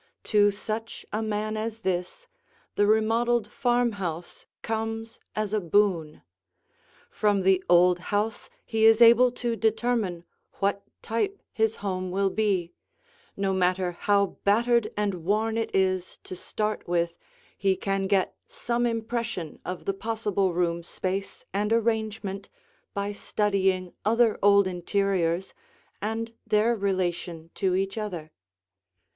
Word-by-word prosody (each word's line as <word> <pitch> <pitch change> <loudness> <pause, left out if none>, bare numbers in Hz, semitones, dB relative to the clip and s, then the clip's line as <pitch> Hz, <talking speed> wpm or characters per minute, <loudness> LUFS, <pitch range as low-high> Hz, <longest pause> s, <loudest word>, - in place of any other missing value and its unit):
To 205 -1 +4
such 215 +2 -5
a 215 - 0
man 215 0 -2
as 225 +1 -4
this, 185 - -3 0.5
the 205 - +2
remodeled 225 +2 +2
farmhouse 205 -9 -1 0.2
comes 225 0 -3 0.2
as 215 -1 -2
a 215 - +3
boon. 170 -4 +1 0.9
From 205 -2 +1
the 190 0 +3
old 175 0 +5
house 205 +4 -2 0.2
he 220 -1 +1
is 225 0 +7
able 235 +1 +7
to 240 -2 -2
determine 220 -5 0 0.3
what 200 0 0 0.2
type 390 - -1
his 220 0 +1
home 185 -1 -2
will 195 +1 +1
be; 190 -6 0 0.6
no 195 -1 0
matter 185 -1 +1
how 200 +2 +1
battered 235 +3 +3
and 200 -5 -1
worn 215 +4 +1
it 225 -1 -1
is 185 -1 0
to 185 - -7
start 215 +4 -3
with, 170 -1 +1 0.4
he 195 -1 +1
can 195 0 -1
get 195 -1 +1
some 240 0 -1
impression 230 -7 -3
of 180 0 -6
the 195 - 0
possible 205 -2 -1
room 170 -1 0
space 190 +3 -4
and 205 +2 0
arrangement 220 -3 -1 0.5
by 200 0 -1
studying 195 -3 0
other 230 +1 +3
old 200 0 +6
interiors 185 -1 0 0.5
and 225 +2 -3
their 220 +3 +3
relation 175 -4 -2
to 185 -2 0
each 195 +3 -1
other. 175 -7 -5
205 Hz, 130 wpm, -27 LUFS, 185-225 Hz, 0.9 s, is